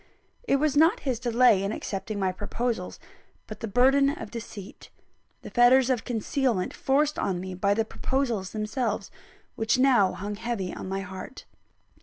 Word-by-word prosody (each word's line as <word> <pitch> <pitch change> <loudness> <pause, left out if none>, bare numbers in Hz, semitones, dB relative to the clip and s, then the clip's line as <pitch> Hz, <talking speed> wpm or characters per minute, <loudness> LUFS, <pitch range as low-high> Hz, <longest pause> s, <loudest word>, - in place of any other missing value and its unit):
It - - +3
was 295 +1 +1
not 325 +10 +4
his 255 -5 -2
delay 240 -4 +4
in 195 +1 -2
accepting 210 0 -4
my 190 -2 0
proposals, 210 +1 -3 0.5
but 215 - -9
the 225 - -4
burden 265 +6 +4
of 285 - -6
deceit, 215 -4 -9 0.5
the - - -9
fetters 255 +1 +5
of 245 -3 -1
concealment 240 -3 -1
forced 290 +3 +1
on 185 -3 -1
me 185 +1 -6
by 200 +2 +1
the 225 0 +1
proposals 235 -6 -2
themselves, 215 +1 -3 0.4
which 225 +3 +1
now 250 -8 +4
hung 200 +3 -5
heavy 225 -5 -3
on - - -7
my 195 0 -2
heart. 190 +7 -9
225 Hz, 160 wpm, -26 LUFS, 200-260 Hz, 0.5 s, fetters